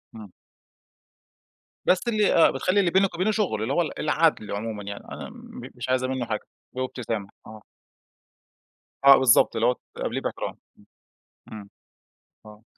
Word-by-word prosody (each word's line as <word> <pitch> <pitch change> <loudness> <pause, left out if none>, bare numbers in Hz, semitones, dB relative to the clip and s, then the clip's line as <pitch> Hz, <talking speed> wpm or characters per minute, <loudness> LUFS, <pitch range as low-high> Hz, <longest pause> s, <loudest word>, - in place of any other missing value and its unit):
إمم. 105 -4 -11 1.5
بس 185 +6 +2
اللي 215 -3 +2
آه، 165 - +6
بتخلّي 185 +2 +1
اللي 175 -4 +2
بينِك 190 -1 +2
وبينه 190 +5 +1
شغل، 195 - -1
اللي 125 +5 -1
هو 175 - +2
ال 155 - -4
العدل 155 -6 +1
عمومًا 105 0 -4
يعني، 100 0 -7
أنا - - -7
م - - -12
مش - - -6
عايزة 130 0 +1
منه 130 -2 -2
حاجة. 110 -2 -3 0.3
وبابتسامة. 125 -5 -4 0.2
آه. 110 -1 -11 1.4
آه 140 -1 +10
بالضبط، 130 -3 +4
اللي 115 +1 +2
هو 125 - +2 0.2
تقابليه - - -3
باحترام. - - -4 0.9
إمم. 110 - -7 0.9
إمم. 105 0 -12
آه. 110 - -25
130 Hz, 150 wpm, -25 LUFS, 110-170 Hz, 1.5 s, آه